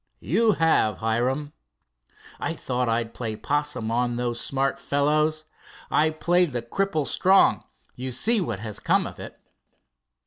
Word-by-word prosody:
"You 215 Hz, -, +3 dB
have, 160 Hz, -, +2 dB
Hiram." 125 Hz, +6 st, -1 dB, 0.9 s
"I -, -, -2 dB
thought 125 Hz, -1 st, -2 dB
I'd 115 Hz, 0 st, -1 dB
play 115 Hz, -3 st, -4 dB
'possum 145 Hz, -3 st, -2 dB
on 120 Hz, +1 st, 0 dB
those 120 Hz, -1 st, -2 dB
smart 135 Hz, 0 st, -1 dB
fellows. 150 Hz, +3 st, +1 dB, 0.5 s
I 155 Hz, +1 st, +3 dB
played 170 Hz, 0 st, +1 dB
the 120 Hz, -1 st, -2 dB
cripple 160 Hz, +3 st, -1 dB
strong. 190 Hz, +6 st, +4 dB, 0.3 s
You 130 Hz, +1 st, -5 dB
see 220 Hz, -, +2 dB
what 115 Hz, -, -3 dB
has 110 Hz, -2 st, -5 dB
come -, -, +2 dB
of -, -, -8 dB
it." -, -, -10 dB
135 Hz, 140 wpm, -25 LUFS, 120-155 Hz, 0.9 s, strong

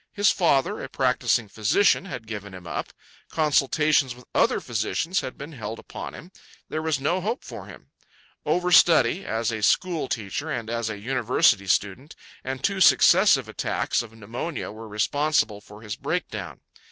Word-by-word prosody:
His 205 Hz, -1 st, +3 dB
father, 170 Hz, +3 st, +1 dB
a -, -, -6 dB
practising 125 Hz, -3 st, +1 dB
physician, 110 Hz, -, +2 dB
had 120 Hz, -, -7 dB
given 100 Hz, -3 st, -7 dB
him 90 Hz, -1 st, -11 dB
up. 80 Hz, -, -5 dB, 0.4 s
Consultations 150 Hz, -3 st, +2 dB
with 125 Hz, -, -16 dB
other -, -, +3 dB
physicians 125 Hz, -, -1 dB
had 130 Hz, -, -6 dB
been 145 Hz, +3 st, -8 dB
held 115 Hz, -5 st, -6 dB
upon -, -, -8 dB
him. 175 Hz, -, -12 dB, 0.4 s
There 155 Hz, -, -3 dB
was 160 Hz, -3 st, 0 dB
no 170 Hz, +7 st, 0 dB
hope 225 Hz, +7 st, -3 dB
for -, -, -9 dB
him. -, -, -14 dB, 0.5 s
Overstudy 175 Hz, -2 st, +4 dB
(as 115 Hz, +1 st, -1 dB
a 110 Hz, -1 st, -4 dB
school 165 Hz, -, +1 dB
teacher 115 Hz, +8 st, -4 dB
and 115 Hz, -6 st, -4 dB
as 115 Hz, -1 st, -2 dB
a 110 Hz, -, -5 dB
university 115 Hz, -3 st, +2 dB
student) 105 Hz, +10 st, -1 dB, 0.3 s
and 130 Hz, 0 st, -5 dB
two 195 Hz, -1 st, 0 dB
successive -, -, +5 dB
attacks -, -, -1 dB
of 115 Hz, -2 st, -10 dB
pneumonia 115 Hz, +9 st, -5 dB
were 110 Hz, +1 st, -10 dB
responsible 110 Hz, 0 st, 0 dB
for 105 Hz, +2 st, -14 dB
his 105 Hz, -2 st, -5 dB
breakdown. -, -, -4 dB
125 Hz, 160 wpm, -25 LUFS, 110-160 Hz, 0.5 s, successive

